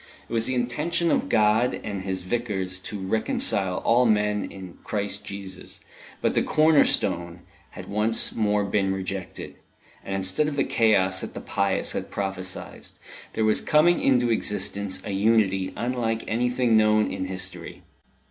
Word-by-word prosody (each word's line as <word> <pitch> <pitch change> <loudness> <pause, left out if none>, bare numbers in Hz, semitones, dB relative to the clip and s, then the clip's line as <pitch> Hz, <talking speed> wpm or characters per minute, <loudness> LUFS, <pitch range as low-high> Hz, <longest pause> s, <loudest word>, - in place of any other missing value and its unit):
It - - -9
was 115 0 +2
the 130 - -1
intention 155 +8 0
of - - 0
God 110 +3 +3
and 100 -2 -4
of - - -7
His 95 -1 -3
Vicars 95 -4 -2
to 105 - -4
reconcile 95 -1 0
all 120 +2 +4
men 105 -1 +1
in 95 -3 -10
Christ 105 0 -3
Jesus; 100 -2 -7 0.4
but - - +2
the - - +2
corner 155 -1 +4
stone 85 0 0 0.4
had - - -8
once 105 +2 +1
more 105 -2 +1
been 100 -1 0
rejected, 95 -1 -6 0.5
and 95 - -4
instead 95 +10 0
of 150 - -3
the 140 - +2
chaos 95 -5 +2
that - - -7
the - - -4
pious 100 -2 -1
had - - -4
prophesied, 95 -2 -5 0.5
there 110 - 0
was 110 - +3
coming 165 +3 +3
into 125 -3 +3
existence 100 -3 -1
a 100 - -4
unity 95 -2 +2
unlike 120 -2 -2
anything 125 +1 +1
known 110 0 +4
in 95 - -3
history. 95 -1 -5
105 Hz, 155 wpm, -25 LUFS, 95-115 Hz, 0.5 s, all